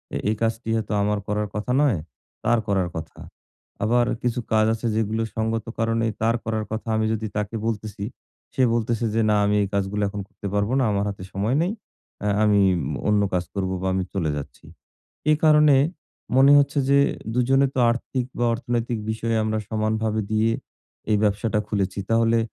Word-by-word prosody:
এ - - +1
এই 110 - +1
কাজটি 115 0 -1
হয়তো 110 -1 -2
আমার 105 0 +1
করার 105 0 -1
কথা 105 +4 -2
নয়, 120 - +2 0.4
তার 120 -1 +3
করার 95 -3 +1
কথা। 80 0 -8 0.6
আবার 120 +3 +3 0.2
কিছু 125 0 0
কাজ 110 0 +4
আছে 115 +1 -3
যেগুলো 110 0 0 0.2
সংগত 110 0 -1
কারণে 115 0 +1 0.2
তার 115 +1 +2
করার 110 -1 -1
কথা। 110 +1 -4
আমি 110 - +1
যদি 110 0 -3
তাকে 105 +2 -2
বলতেছি, 105 -2 -4 0.5
সে - - 0
বলতেছে 115 0 0
যে, 115 - +3
"না 105 - +4
আমি 105 0 +2
এই - - -1
কাজগুলো 100 +1 -1
এখন 100 0 -5
করতে 100 - -8
পারবো 100 +3 +1
না। - - +3
আমার 100 0 0
হাতে 100 -2 -7
সময় 105 +7 0
নেই। 185 - 0 0.5
আ - - +1 0.2
আমি 105 -1 +4 0.5
অন্য 105 -1 +3
কাজ 90 -1 +1
করবো 95 -1 -1
বা 95 - -1
আমি 95 - 0
চলে 85 -6 0
যাচ্ছি।" 70 +1 -9 0.7
এ - - +7
কারণে 150 -2 +6 0.6
মনে 135 +2 +7
হচ্ছে 140 +1 +1
যে, 140 - +5 0.4
২ 125 - +1
জনে 135 +1 +4
তো 130 - +1
আর্থিক 125 +1 -3
বা 120 - +1
অর্থনৈতিক 120 -1 -2
বিষয়ে 115 +1 -1
আমরা 110 0 0
সমানভাবে 110 0 0
দিয়ে 110 +1 +2 0.6
এই 105 - +4
ব্যবসাটা 105 +1 +1
খুলেছি। 100 -2 -1
তাহলে 115 0 +3
110 Hz, 180 wpm, -24 LUFS, 105-115 Hz, 0.7 s, এ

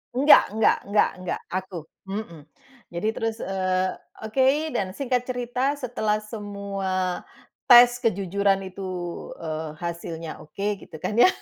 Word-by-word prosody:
Enggak 285 +4 +7
enggak 220 0 +4
enggak 205 +1 +3
enggak. 185 -1 -3
Aku. 185 0 -3 0.3
Mhm. 180 -7 -6 0.4
Jadi 175 +5 -3
terus, 225 0 -3
eee, 185 -1 0 0.3
oke, 270 +7 +2
dan 190 -6 -2
singkat 250 -3 -1
cerita, 250 +2 -1
setelah 220 -6 -1
semua 200 -4 -3 0.5
tes 245 0 +8
kejujuran 200 -2 +1
itu, 190 0 -6 0.5
eee, 155 -1 -5
hasilnya 170 -1 -6
oke, 200 +6 -3
gitu - - -13
kan, 215 - -1
ya. 245 - +9
200 Hz, 125 wpm, -25 LUFS, 185-240 Hz, 0.5 s, ya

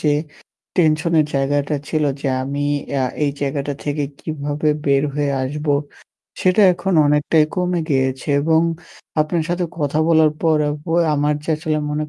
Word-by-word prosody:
যে 150 - +1 0.7
টেনশন 160 -1 +2
এর 150 - +1
জায়গাটা 140 +2 0
ছিল 155 -2 0 0.2
যে 145 - -3 0.2
আমি 140 +2 -3 0.4
আ - - +1 0.2
এই 145 - +1
জায়গাটা 140 0 -2
থেকে 145 0 -1 0.2
কিভাবে 150 -1 -2 0.2
বের 140 -1 +3
হয়ে 145 -1 0
আসবো 145 +2 -1 0.7
সেটা 185 +3 +4
এখন 175 +2 -2
অনেকটাই 150 +2 +3
কমে 180 -1 0
গিয়েছে 130 0 0
এবং 160 +2 +3 0.6
আপনার 160 +2 0
সাথে 175 +1 0
কথা 145 0 0
বলার 160 -2 +5
পর 160 -2 +3
অবয় 165 +3 0
আমার 150 +1 +1
যে 160 - -3
আসলে 155 0 -1
মনের 150 +1 -2
150 Hz, 155 wpm, -20 LUFS, 145-160 Hz, 0.7 s, বলার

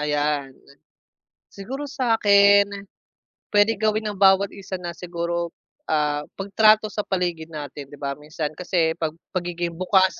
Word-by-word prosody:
Ayan. 145 -2 -1 1.0
Siguro 260 +9 -6
sa 255 -5 0
akin 200 -1 +6 0.8
puwede 205 +1 +3
gawin 215 0 0
ng 200 - -10
bawat 195 0 +5
isa 195 -1 -7
na 175 -1 -5
siguro, 170 0 -3 0.4
ah, 150 -1 +1
pagtrato 215 +2 +3
sa 210 - -2
paligid 175 -4 -2
natin 145 -3 -7
'di 145 - -12
ba, 140 -1 -3
minsan 150 0 -4
kasi 170 -1 0
pag 160 -1 -2 0.2
pagiging 175 -1 -3
bukas 185 +2 +2
180 Hz, 135 wpm, -23 LUFS, 155-200 Hz, 1.0 s, akin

